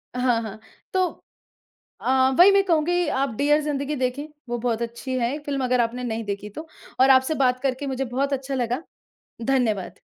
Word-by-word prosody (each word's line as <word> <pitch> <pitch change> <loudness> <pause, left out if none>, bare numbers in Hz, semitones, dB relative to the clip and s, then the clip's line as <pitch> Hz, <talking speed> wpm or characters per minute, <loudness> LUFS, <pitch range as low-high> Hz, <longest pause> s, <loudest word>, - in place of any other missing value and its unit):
हाँ, 250 -2 +2
हाँ। 220 -1 -7 0.3
तो 375 - +2 1.0
अ, 260 0 +3
वही 370 +3 +9
मैं 395 0 +4
कहूँगी 350 -1 +1
आप 270 -1 0
डियर 295 +3 +3
ज़िंदगी 290 0 -2
देखें, 260 +3 -2 0.2
वो 240 - -1
बहुत 235 -1 -1
अच्छी 235 +3 -4
है 245 +5 0
फिल्म 275 -2 -2
अगर 250 -1 +2
आपने 235 +2 -2
नहीं 225 -2 -3
देखी 205 +1 -4
तो 310 +10 -9 0.3
और 265 +1 +6
आपसे 260 +4 +5
बात 255 -2 +2
करके 275 +1 -1
मुझे 265 0 -2
बहुत 275 +3 -1
अच्छा 270 0 -3
लगा। 245 +5 -1 0.6
धन्यवाद। 235 -8 0
260 Hz, 175 wpm, -24 LUFS, 240-285 Hz, 1.0 s, वही